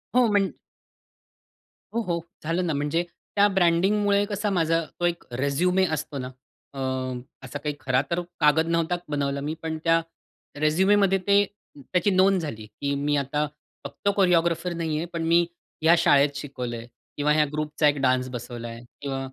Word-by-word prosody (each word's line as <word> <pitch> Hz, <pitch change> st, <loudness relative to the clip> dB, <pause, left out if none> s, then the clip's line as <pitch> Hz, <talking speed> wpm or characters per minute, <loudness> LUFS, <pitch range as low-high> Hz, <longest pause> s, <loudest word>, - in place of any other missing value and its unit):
हो 250 Hz, -1 st, +6 dB
म्हण 200 Hz, -2 st, +2 dB, 1.4 s
हो, 235 Hz, -, +2 dB
हो, 175 Hz, -6 st, -1 dB, 0.2 s
झालं 165 Hz, +3 st, 0 dB
ना 160 Hz, -, 0 dB
म्हणजे 150 Hz, +4 st, 0 dB, 0.3 s
त्या 205 Hz, 0 st, +6 dB
ब्रँडिंगमुळे 200 Hz, +2 st, +3 dB
कसा 205 Hz, 0 st, -2 dB
माझा 165 Hz, -3 st, +2 dB, 0.2 s
तो 175 Hz, -, +1 dB
एक 170 Hz, -1 st, -1 dB
रेझ्युमे 140 Hz, +9 st, +2 dB
असतो 150 Hz, -1 st, -5 dB
ना 130 Hz, -1 st, -4 dB, 0.5 s
अ, 135 Hz, -, -7 dB, 0.7 s
असा 145 Hz, -, -6 dB
काही 150 Hz, 0 st, -3 dB
खरा 130 Hz, 0 st, +2 dB
तर 170 Hz, +1 st, +1 dB, 0.2 s
कागद 160 Hz, +1 st, +4 dB
नव्हता 170 Hz, +1 st, +1 dB
बनवला 140 Hz, -1 st, -1 dB
मी, 150 Hz, +2 st, -2 dB
पण 160 Hz, -1 st, -3 dB
त्या 165 Hz, 0 st, +4 dB, 0.6 s
रेझ्युमेमध्ये 190 Hz, +5 st, +3 dB
ते 200 Hz, 0 st, +6 dB, 0.3 s
त्याची 175 Hz, +7 st, 0 dB
नोंद 190 Hz, 0 st, +4 dB
झाली, 110 Hz, -9 st, -6 dB
की 140 Hz, +6 st, -4 dB
मी 145 Hz, +1 st, 0 dB
आता 145 Hz, +2 st, 0 dB, 0.4 s
फक्त 200 Hz, -, -2 dB
कोरिओग्राफर 170 Hz, -2 st, +2 dB
नाहीये, 165 Hz, -1 st, -2 dB
पण 165 Hz, -1 st, -2 dB
मी 170 Hz, +1 st, +5 dB, 0.4 s
ह्या 165 Hz, +2 st, +6 dB
शाळेत 145 Hz, -4 st, +5 dB
शिकवलंय 125 Hz, -5 st, -5 dB, 0.3 s
किंवा 150 Hz, 0 st, +2 dB
ह्या 150 Hz, 0 st, +4 dB
ग्रुपचा 150 Hz, 0 st, +1 dB
एक 145 Hz, 0 st, +2 dB
डान्स 130 Hz, -1 st, +2 dB
बसवलाय 120 Hz, -1 st, -7 dB, 0.2 s
किंवा 135 Hz, -2 st, -3 dB
160 Hz, 155 wpm, -25 LUFS, 140-180 Hz, 1.4 s, हो